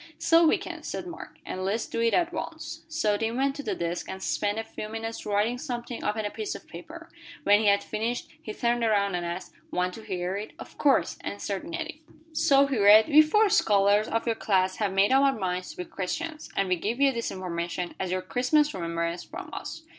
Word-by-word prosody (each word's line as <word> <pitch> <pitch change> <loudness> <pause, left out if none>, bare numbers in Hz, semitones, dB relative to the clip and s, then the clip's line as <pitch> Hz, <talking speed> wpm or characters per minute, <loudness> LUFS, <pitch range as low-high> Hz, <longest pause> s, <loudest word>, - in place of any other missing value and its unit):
"So 330 0 +5
we - - +4
can," - - -7
said - - -5
Mark, 345 -1 -9
"and 185 - -4
let's 205 +4 0
do - - -4
it 230 -1 +3
at 345 -1 +1
once." - - -6
So 305 -11 +1
Tim 225 +2 -2
went 275 +1 +1
to - - -3
the - - -2
desk, 170 +1 -3
and 190 - -5
spent 205 +1 0
a 225 - -1
few 215 -1 -7
minutes 225 0 -5
writing 210 +4 +1
something 240 -3 -5
upon 215 0 -1
a 205 - -2
piece 430 -2 -4
of - - -10
paper. - - -10 0.4
When 205 +1 +6
he 215 - +1
had 200 0 +4
finished, 230 +3 -3
he 215 - -6
turned 235 +1 0
around 200 -3 +2
and 175 -1 -1
asked; 175 +2 -5 0.2
"Want 180 0 -1
to 225 - -9
hear 185 -3 -3
it?" 210 +2 -6
"Of - - -12
course," 280 -2 +2
answered 200 +3 -4
Nettie. 330 -2 -5 0.3
So 295 -3 +5
he 275 -5 -1
read: 210 +5 +7
"We 305 0 +8
four 420 +8 +4
scholars 205 - +4
of 230 - -1
your 230 - +2
class 190 -4 +1
have 205 -3 0
made 195 +3 +3
up 270 +1 +6
our 275 -2 +3
minds 180 -2 -2
to - - -10
be 180 - -4
Christians, 305 - -4
and 195 - +1
we 180 -1 +1
give 225 +8 -2
you 280 -1 +5
this 235 -2 -3
information 175 -1 -4
as 185 - -2
your 185 0 -1
Christmas 255 +10 +2
remembrance 170 -1 -2
from - - -9
us." 325 - -6
215 Hz, 225 wpm, -27 LUFS, 190-270 Hz, 0.4 s, We